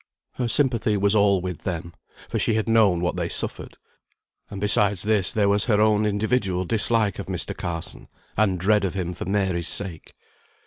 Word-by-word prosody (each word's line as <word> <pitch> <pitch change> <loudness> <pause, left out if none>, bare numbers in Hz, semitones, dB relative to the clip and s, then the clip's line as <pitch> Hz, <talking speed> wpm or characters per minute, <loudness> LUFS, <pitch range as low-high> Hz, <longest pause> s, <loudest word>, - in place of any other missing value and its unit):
Her 125 - -3
sympathy 115 -4 +1
was 100 +1 +2
all 100 -2 +3
with 90 -2 -5
them, 85 -2 -5 0.3
for - - -3
she 110 - +1
had 110 0 -1
known 105 -6 +3
what 90 - -2
they - - -2
suffered; - - -2 0.7
and 100 - -7
besides 100 -1 +2
this 105 -3 +2
there 105 -4 +1
was 100 0 +2
her 105 -4 +2
own 105 0 +3
individual 100 -3 -1
dislike 110 -1 +1
of - - -6
Mr. - - -1
Carson, 85 -1 -6 0.3
and 100 -4 +1
dread 105 +3 +2
of 95 -1 -2
him 90 -2 -3
for 90 - -7
Mary's 95 -3 -1
sake. 95 -6 -3
100 Hz, 180 wpm, -23 LUFS, 90-110 Hz, 0.7 s, all